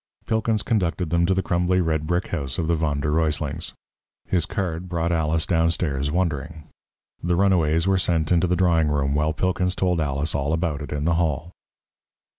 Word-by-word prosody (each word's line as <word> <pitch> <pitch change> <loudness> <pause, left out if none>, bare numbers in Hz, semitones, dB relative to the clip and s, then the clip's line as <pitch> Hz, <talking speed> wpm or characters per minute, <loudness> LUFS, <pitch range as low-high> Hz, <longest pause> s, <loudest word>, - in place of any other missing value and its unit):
Pilkins 110 -1 0
conducted 90 -6 -1
them 85 0 +2
to 95 - +2
the 95 - 0
crumbly 90 +2 +1
red 80 -3 0
brick 90 +2 -1
house 70 -7 -3
of 85 - -1
the 85 - +2
Von 75 -3 0
der 75 - 0
Ruyslings. 75 -1 -1 0.5
His 90 -3 0
card 90 -2 -3
brought 85 -1 -1
Alice 80 0 +1
downstairs 80 -5 0
wondering. 80 -3 -2 0.6
The 85 +1 +1
runaways 85 -4 +2
were 95 -1 +3
sent 85 -3 0
into 90 0 +3
the 90 - +1
drawing 85 -4 +3
room, 70 -2 0
while 75 +2 +1
Pilkins 90 +2 0
told 90 -3 +1
Alice 70 +1 -1
all 70 +2 -1
about 80 -3 -1
it 75 - -7
in 75 0 -2
the 85 - +2
hall. 80 +1 -2
85 Hz, 185 wpm, -23 LUFS, 75-90 Hz, 0.6 s, were